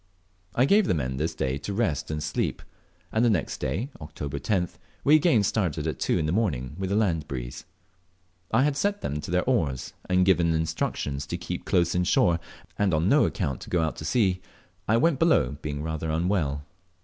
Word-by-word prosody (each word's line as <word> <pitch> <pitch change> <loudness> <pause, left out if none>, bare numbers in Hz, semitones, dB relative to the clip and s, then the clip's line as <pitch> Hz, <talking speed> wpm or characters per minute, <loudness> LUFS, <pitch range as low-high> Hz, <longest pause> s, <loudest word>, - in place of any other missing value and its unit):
I 125 - +4
gave 200 +6 +4
the - - +2
men 65 -4 -2
this 80 +4 -2
day 65 +1 -1
to 100 +7 -4
rest 100 - 0
and 75 -1 -3
sleep; 75 +1 -2 0.5
and 110 - +2
the 120 - +5
next 95 -9 0
day 125 +8 -2
(Oct. 75 -1 -10
10th) 75 +6 -2 0.2
we 150 - +6
again 155 - +4
started 85 -7 0
at 80 - -3
two - - +1
in 75 - 0
the 75 - 0
morning 75 - -1
with 95 0 -2
a - - +2
land 85 -8 +1
breeze. - - -6 0.9
After 115 - +3
I - - +5
had 145 -1 +1
set 205 +6 0
them 75 - -3
to 75 - -7
their 90 +1 +2
oars, 75 - 0 0.2
and 90 0 +4
given 85 -3 +3
instructions 80 -3 -2
to - - -3
keep - - -5
close 85 -1 +2
in 90 - +2
shore, 85 -1 +3 0.4
and 100 -5 +3
on 80 +5 +2
no 145 +4 +5
account 75 - -2
to - - -9
get 90 - +1
out 80 - -1
to - - -6
sea, 95 -7 +2 0.5
I 110 - +4
went 155 +1 +2
below, 75 - +3
being 75 -1 -4
rather 80 0 -3
unwell. 80 -4 0
85 Hz, 210 wpm, -26 LUFS, 75-110 Hz, 0.9 s, we